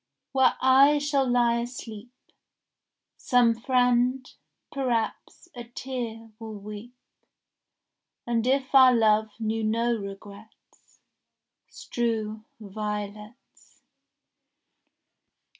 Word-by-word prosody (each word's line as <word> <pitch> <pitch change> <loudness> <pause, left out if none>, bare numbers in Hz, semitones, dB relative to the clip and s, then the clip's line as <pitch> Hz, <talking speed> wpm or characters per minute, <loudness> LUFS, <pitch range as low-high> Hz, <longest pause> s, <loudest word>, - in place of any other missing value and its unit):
Where 265 -1 +3
I 270 +3 +5
shall 285 -3 0
lie 240 -1 +2
asleep, 235 -2 -8 1.1
Some 245 -2 +3
friend, 250 +1 +1 0.4
perhaps, 255 +3 -3
a 240 -1 -8
tear 235 -2 -6
will 220 -1 -8
weep, 210 +4 -10 1.3
And 235 0 -1
if 270 +1 0
our 260 -2 +7
love 215 -1 +3
knew 220 0 -2
no 230 +2 +1
regrets, 200 +1 -12 0.7
Strew 220 -2 -3 0.2
violets. 210 +2 -8
235 Hz, 80 wpm, -26 LUFS, 215-255 Hz, 1.3 s, our